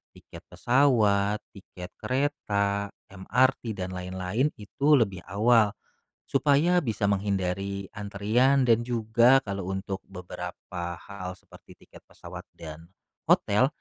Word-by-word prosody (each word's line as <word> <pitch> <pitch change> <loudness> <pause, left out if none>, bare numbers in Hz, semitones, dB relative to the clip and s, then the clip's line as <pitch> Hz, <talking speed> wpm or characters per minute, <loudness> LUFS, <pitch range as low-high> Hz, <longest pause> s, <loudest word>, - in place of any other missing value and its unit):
tiket - - -13
pesawat, 105 -6 +2 0.2
tiket 90 -2 -10
kereta, 105 -6 -1 0.2
MRT, 120 +5 +1
dan 95 -1 -4
lain-lain, 95 +7 -1
itu 105 +8 -3
lebih 100 -5 0
awal, 110 +2 +3 0.6
supaya 145 +6 +3
bisa 110 -5 -3
menghindari 100 -1 -2
antrian 110 +6 +2
dan 115 -1 +5
juga 120 +2 +4
kalau 100 -2 -4
untuk 95 0 -4
beberapa 90 -1 -7
hal 90 -2 -7
seperti - - -17
tiket - - -16
pesawat - - -11
dan 80 +1 -10 0.4
hotel, 105 +6 +4
100 Hz, 110 wpm, -27 LUFS, 95-120 Hz, 0.6 s, dan